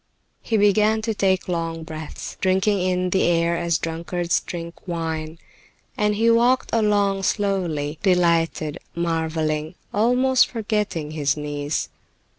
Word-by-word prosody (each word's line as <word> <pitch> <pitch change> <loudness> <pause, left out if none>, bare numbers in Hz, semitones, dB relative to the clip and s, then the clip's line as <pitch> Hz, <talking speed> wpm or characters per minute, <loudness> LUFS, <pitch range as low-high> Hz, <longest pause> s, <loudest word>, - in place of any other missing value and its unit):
He 225 - 0
began 215 +2 +3
to 225 0 0
take 190 -2 +1
long 165 -2 -2
breaths, 155 -1 -7
drinking 190 +1 +2
in 180 0 0
the 190 - +2
air 170 0 +2
as 170 -1 0
drunkards 170 +1 -1
drink 170 +1 -8
wine, 160 -2 -3 0.6
and 210 0 +1
he 230 +2 +3
walked 240 +3 +3
along 205 -3 +2
slowly, 175 -7 -1
delighted, 170 -4 +1 0.2
marveling, 160 -1 -1 0.2
almost 250 +4 +3
forgetting 210 -9 -2
his 145 -2 0
niece. 145 0 -3
175 Hz, 120 wpm, -23 LUFS, 160-205 Hz, 0.6 s, began